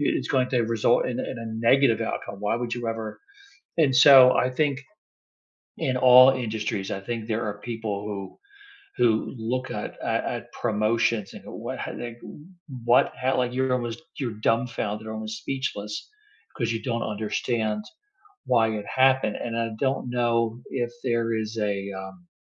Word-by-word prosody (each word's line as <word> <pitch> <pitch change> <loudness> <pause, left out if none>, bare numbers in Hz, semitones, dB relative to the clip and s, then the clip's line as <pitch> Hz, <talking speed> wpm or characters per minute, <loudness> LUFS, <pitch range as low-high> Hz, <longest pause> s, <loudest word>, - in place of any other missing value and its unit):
it's 145 - 0
going 130 -2 +2
to 125 -3 +2
result 115 +1 +2
in 125 -1 -3
in 120 - -5
a 115 - -6 0.2
negative 135 -4 +4
outcome. 100 -2 -4
Why 105 +2 0
would 120 0 -3
you 120 -1 -5
ever 110 -1 -5 0.6
and 140 -5 +4
so 130 -1 +9
I 130 - +2
think 140 0 0 1.0
in 130 -1 0
all 130 +1 +8
industries, 110 -5 -3
I 95 - -3
think 115 +1 -5
there 110 0 -1
are 105 0 -4
people 110 -3 -4
who 100 -2 -6 0.6
who 110 0 +2
look 125 +3 -3
at - - -5
at - - 0
at - - -5
promotions 110 -1 +1
and - - -11
what - - -6
h - - -4
like, 120 0 -7
w - - -10 0.5
what 120 +1 +4
ho 130 +1 +1
like, 125 -1 0
you're 130 0 +1
almost 120 +2 -3 0.2
you're 115 -6 -4
dumbfounded, 110 -2 -1
almost 110 0 -5
speechless 105 -6 -4 0.5
'cause 115 -5 -1
you 115 -1 -2
don't 115 -2 -1
understand 110 0 -1 0.6
why 115 -2 +3
it 105 - -8 0.2
happened 130 -5 +3
and 115 - -4
I - - -1 0.2
don't 130 0 0
know 115 -1 +1
if 120 -2 -2
there 115 -2 0 0.2
is 110 +1 -7
a, 105 -2 0 0.3
um 95 -2 -11
115 Hz, 165 wpm, -25 LUFS, 110-125 Hz, 1.0 s, so